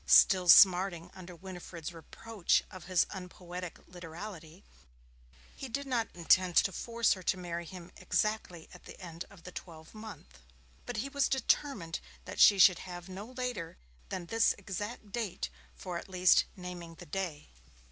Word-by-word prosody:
Still 185 -2 +6
smarting 180 -2 +7
under 180 -1 -10
Winifred's 180 -2 -8
reproach 195 +4 0
of 185 -3 -10
his 180 -2 +3
unpoetic 180 -1 -7
literality, 175 0 -9 0.9
he 270 - -7
did 280 +4 -3
not 245 -4 0
intend 180 +1 +3
to 195 - +5
force 230 +5 +1
her 185 - -8
to 185 - 0
marry 170 -1 -5
him 180 0 -10
exactly 215 -6 -1
at 180 - -14
the - - -11
end 170 -2 -7
of 190 -4 -16
the 180 - -9
twelve 160 -3 -10
month. 215 - -11 0.5
But 245 - -4
he - - -5
was 280 -1 +1
determined 260 - 0 0.3
that - - -7
she 200 - +8
should 185 -2 +7
have 175 +1 -8
no 195 +3 -7
later 250 - -4 0.3
than 175 - -4
this 225 +5 +3
exact 205 +2 -6
date 225 -5 -3 0.3
for 180 -2 -5
at - - -12
least 185 -1 +5
'naming 180 -2 -8
the - - -11
day'. 165 -3 -4
185 Hz, 155 wpm, -32 LUFS, 170-210 Hz, 0.9 s, she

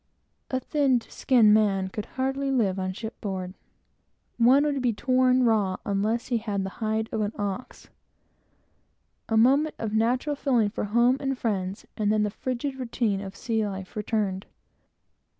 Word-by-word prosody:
A 260 - 0
thin 275 -3 +2
skinned 225 -3 +3
man 195 -3 +2
could 210 +2 -6
not 265 +1 0
live 255 -9 0
an - - -1
hour - - -2
on 185 - -3
ship 220 +3 -8
board. 185 -3 -4 0.9
One 255 +5 +6
would 285 -2 0
be 245 -2 +1
torn 255 +2 +3
raw 210 -5 +2
unless 215 +5 -1
he 240 -2 +1
had 205 -3 -2
the 190 - -4
hide 220 0 0
of 220 - -1
an 210 +1 -1
ox. 205 +3 -5 1.4
A 225 - +2
moment 275 +7 +4
of 220 -2 -4
natural 245 +6 +1
feeling 245 -7 +1
for 210 - -3
home 235 +5 +3
and 270 -1 -2
friends, 195 -5 -2
and 210 -1 +1
then 215 0 +2
the 210 - -1
frigid 260 +4 -4
routine 230 -5 -1
of 195 0 -8
sea 225 -2 -1
life 190 -2 -7
returned. 210 -3 -2
220 Hz, 170 wpm, -26 LUFS, 205-255 Hz, 1.4 s, One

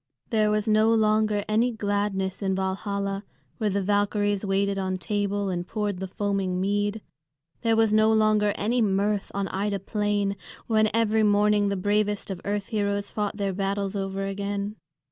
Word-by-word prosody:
There 215 -1 +3
was 210 0 0
no 215 +1 +4
longer 215 -2 +2
any 225 +3 +2
gladness 200 -3 -1
in 190 -1 0
Valhalla, 195 +1 -2 0.4
where 215 -2 +1
the 200 0 0
Valkyries 205 0 +1
waited 195 0 0
on 185 -1 -1
table 205 +1 -1
and 175 -1 -3
poured 205 -4 -2
the 190 - -4
foaming 195 -2 -1
mead. 205 +2 0 0.6
There 230 -1 +2
was 220 -1 +3
no 215 0 +5
longer 215 -1 +3
any 235 +4 0
mirth 200 0 0
on 200 -1 -1
Ida 200 +1 -1
Plain, 205 0 -1 0.3
when 215 -1 +3
every 220 -1 +2
morning 205 -1 +3
the 200 - -1
bravest 205 +1 0
of 185 - -6
earth 205 0 -2
heroes 200 -2 -1
fought 210 -1 -2
their 200 -2 -1
battles 195 +1 -2
over 195 0 -2
again. 200 +1 -3
205 Hz, 165 wpm, -26 LUFS, 195-215 Hz, 0.6 s, no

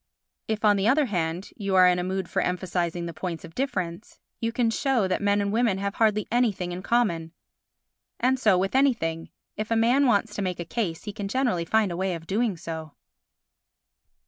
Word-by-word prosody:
If, 220 0 -1
on 205 -1 +5
the 195 +2 +1
other 285 +5 +4
hand, 175 -4 -2
you 195 -3 -1
are 185 -1 +7
in 180 0 +3
a - - -1
mood 190 +1 -2
for - - -1
emphasising 175 -1 -2
the 170 - -5
points 170 0 -5
of 165 - -13
difference, 185 -8 -4 0.2
you 230 0 -1
can 230 -1 +1
show 250 -4 +1
that 185 - -1
men 200 0 +2
and 200 0 -1
women 225 -4 +2
have 200 0 -2
hardly 215 -2 +1
anything 215 -7 +1
in 175 +1 -5
common. 175 -8 0 0.9
And 260 +1 +2
so 210 -7 +4
with 195 +2 0
anything: 225 -13 +1 0.3
if 215 0 -3
a 230 - +2
man 245 +5 +4
wants 210 -2 +2
to 205 - -3
make 185 -2 -2
a 170 - -4
case 170 -5 -3
he 210 - -6
can 205 -1 -4
generally 225 -7 0
find 215 +1 +2
a 170 - -4
way 185 -1 -1
of 165 -1 -9
doing 205 +1 0
so. 160 -2 -7
200 Hz, 205 wpm, -26 LUFS, 175-225 Hz, 0.9 s, are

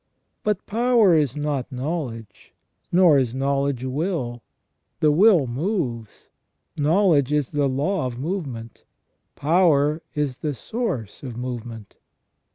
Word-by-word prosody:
But 210 -2 -1
power 230 -3 +3
is 150 -3 +1
not 145 -3 -2
knowledge, 125 - -5 0.4
nor 175 -5 +6
is 125 -2 -1
knowledge 140 -1 0
will; 130 -3 -2 0.6
the 150 - +4
will 180 -1 +5
moves, 125 - -3 0.5
knowledge 150 -2 +3
is 150 -4 0
the 145 -2 +1
law 145 +4 0
of 120 -1 -6
movement, 135 - -5 0.5
power 155 -1 +3
is 145 -4 -2
the 150 -2 -3
source 130 - -4
of 125 -4 -7
movement. 120 -4 -7
145 Hz, 115 wpm, -23 LUFS, 125-170 Hz, 0.6 s, nor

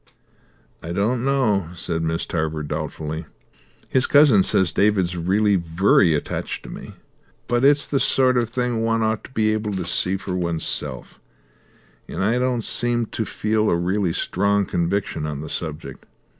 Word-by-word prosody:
"I 85 +1 -6
don't 115 +6 0
know," 110 -10 +1
said 85 -1 -2
Miss 80 0 -1
Tarver 80 -2 -2
doubtfully. 75 +1 -5 0.6
"His 130 -1 +2
cousin 145 -9 +6
says 95 -2 +3
David's 95 -4 +1
really 100 +4 +2
vurry 85 0 +3
attached 75 - -4
to - - -9
me, - - -10 0.5
but 120 +1 0
it's 145 +1 +5
the 140 - 0
sort 130 -1 +3
of 120 -2 +1
thing 125 -2 -1
one 115 0 +1
ought 110 0 -1
to - - -14
be 110 -3 +1
able 105 -1 -2
to 90 -2 -3
see 90 +2 0
for 95 -1 -6
oneself, 85 -3 -3 0.9
and - - -4
I 115 +5 +1
don't 125 -2 0
seem 120 +1 +1
to 110 - -2
feel 110 0 0
a - - +2
really 90 +2 0
strong 100 +4 0
conviction 85 -3 -2
on 75 -2 -5
the 80 - -7
subject. 80 -3 -6
100 Hz, 160 wpm, -22 LUFS, 85-115 Hz, 0.9 s, cousin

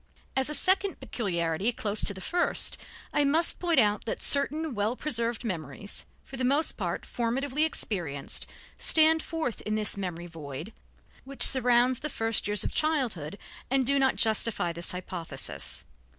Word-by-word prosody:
As 265 +1 +2
a 300 - +1
second 385 +3 +1
peculiarity 175 -1 -1
closely 215 -3 -2
related - - +5
to 200 - +2
the 190 - -9
first, 350 - -1 0.4
I 290 - +3
must 315 +4 +4
point 340 -5 +3
out 210 -2 +2
that 225 - -3
certain 295 +2 +1
well 210 +2 0
preserved 235 -5 -1
memories, 170 -1 -4 0.2
for 270 - -8
the 255 - -2
most 280 +5 +3
part - - -3
formatively 265 +5 0
experienced, 170 - -3 0.3
stand 320 0 +5
forth 315 -9 -3
in 215 - -2
this 210 -2 +1
memory 175 -3 -4
void 160 +3 -8 0.5
which 275 +1 +3
surrounds 250 -1 +5
the 300 - -3
first 225 -5 +1
years 205 -2 +2
of - - -3
childhood 235 - 0 0.3
and 265 0 +2
do 280 +2 +2
not 265 -1 +3
justify 220 -5 +1
this 170 +1 -2
hypothesis. 165 - -4
230 Hz, 160 wpm, -28 LUFS, 185-280 Hz, 0.5 s, related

